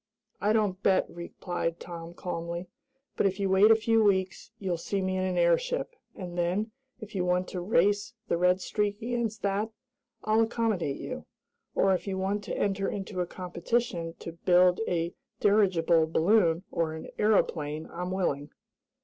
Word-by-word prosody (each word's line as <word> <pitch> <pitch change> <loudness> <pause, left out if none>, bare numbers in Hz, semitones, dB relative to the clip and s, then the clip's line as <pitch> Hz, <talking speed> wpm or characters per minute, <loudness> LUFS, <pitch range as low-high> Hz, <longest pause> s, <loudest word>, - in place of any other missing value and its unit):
"I 210 - +2
don't 205 -4 +1
bet," 190 -2 +3
replied 170 -1 -4
Tom 170 -1 -8
calmly, 170 0 -4 0.5
"but - - +3
if 190 +1 -3
you 195 -1 0
wait 195 +3 +6
a 225 - +8
few 225 0 +3
weeks 190 -1 +1
you'll 185 -5 -2
see 200 +3 -2
me 185 0 -1
in 185 - 0
an 185 -1 -1
airship, 175 - +1 0.2
and 180 -2 -7
then, 180 +6 0 0.3
if 215 -2 -10
you 185 -3 0
want 180 0 +1
to 180 - -4
race 205 +4 +2
the - - +1
Red 180 +2 +3
Streak 205 +1 -1
against 235 -2 -2
that, 200 +2 0 0.5
I'll 215 +1 +3
accommodate 220 -10 0
you. - - -6 0.5
Or, 195 0 +4
if 185 - -2
you 190 -1 -2
want 200 +2 -1
to - - -4
enter 195 -1 0
into 195 -2 -4
a 175 - -2
competition 175 -1 -2
to 170 - -6
build 180 +3 +4
a 170 -1 -1 0.3
dirigible 180 -6 +3
balloon 170 0 +3
or 165 -1 0
an 160 - -8
aeroplane 155 -8 +1
I'm 180 +1 -4
willing." 150 -6 -1
185 Hz, 165 wpm, -28 LUFS, 170-205 Hz, 0.5 s, a